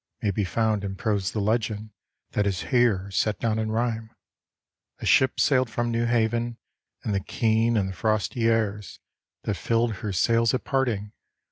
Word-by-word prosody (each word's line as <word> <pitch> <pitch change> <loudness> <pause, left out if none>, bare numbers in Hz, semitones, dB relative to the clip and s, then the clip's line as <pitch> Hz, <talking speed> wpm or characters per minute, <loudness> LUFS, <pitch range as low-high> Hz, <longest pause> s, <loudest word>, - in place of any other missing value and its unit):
May 100 - +2
be 100 +2 -1
found 110 +2 0
in 95 -1 -4
prose 100 -1 0
the 110 - -2
legend 110 0 -1 0.4
That 105 -1 +1
is 95 -3 -1
here 110 -6 +2
set 105 +1 +1
down 110 -1 0
in 110 0 -1
rhyme. 115 -1 -1 0.9
A - - -7
ship 130 0 +4
sailed 130 -3 +3
fram 120 +1 -1
New 115 0 0
Haven, 120 0 0 0.5
And 105 - -1
the 100 - +1
keen 115 +3 +1
and 100 -2 +1
the - - -5
frosty 110 +3 0
airs, 105 -3 -1 0.5
T^at 105 - 0
iilled 115 0 +2
her 105 - -4
sails 115 +4 +2
at - - -3
parting. 120 -7 -1
110 Hz, 170 wpm, -25 LUFS, 105-115 Hz, 0.9 s, ship